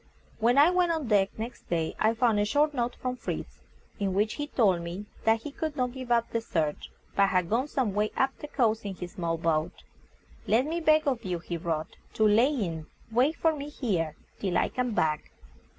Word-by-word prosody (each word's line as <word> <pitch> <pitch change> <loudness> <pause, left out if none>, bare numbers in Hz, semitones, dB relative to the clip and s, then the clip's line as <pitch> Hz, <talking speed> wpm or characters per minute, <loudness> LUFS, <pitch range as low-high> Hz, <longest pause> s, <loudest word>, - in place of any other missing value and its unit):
When 235 +3 +3
I 300 +5 +7
went 360 -1 +2
on 315 -7 -2
deck 200 -2 +4
next 235 +2 -7
day 165 -2 -1
I 220 +1 +3
found 230 -3 +3
a - - +3
short 295 +6 +2
note 245 -2 -1
from 250 0 -4
Fritz, - - -5 0.4
in 195 -2 -1
which 210 +2 +2
he 290 0 -4
told 195 -11 +2
me 175 +4 -6 0.2
that 225 0 +3
he 295 - -5
could 310 +1 -4
not 250 -3 0
give 255 -1 -7
up 235 -1 +2
the 230 - 0
search, 160 -8 -2 0.3
but 200 0 +5
had 185 -2 0
gone 250 +5 +2
some 255 -8 -1
way 210 +1 +1
up 265 0 +2
the 295 - -6
coast 230 -6 +1
in 200 -2 -5
his 180 -1 -7
small 170 -5 -2
boat. 160 -1 -1 0.6
"Let 235 +5 +3
me 325 +3 -2
beg 310 -2 +3
of 255 -4 0
you," 180 -2 -2
he 170 +1 -5
wrote, 160 -2 -3 0.2
"to 220 - +3
lie 215 +4 +5
in 180 - -2 0.2
wait 260 +8 +3
for 325 -1 +2
me 290 0 -6
here 180 - -1 0.2
till 190 -3 0
I - - +2
come 250 -3 -2
back." 155 -1 0
225 Hz, 215 wpm, -28 LUFS, 185-265 Hz, 0.6 s, I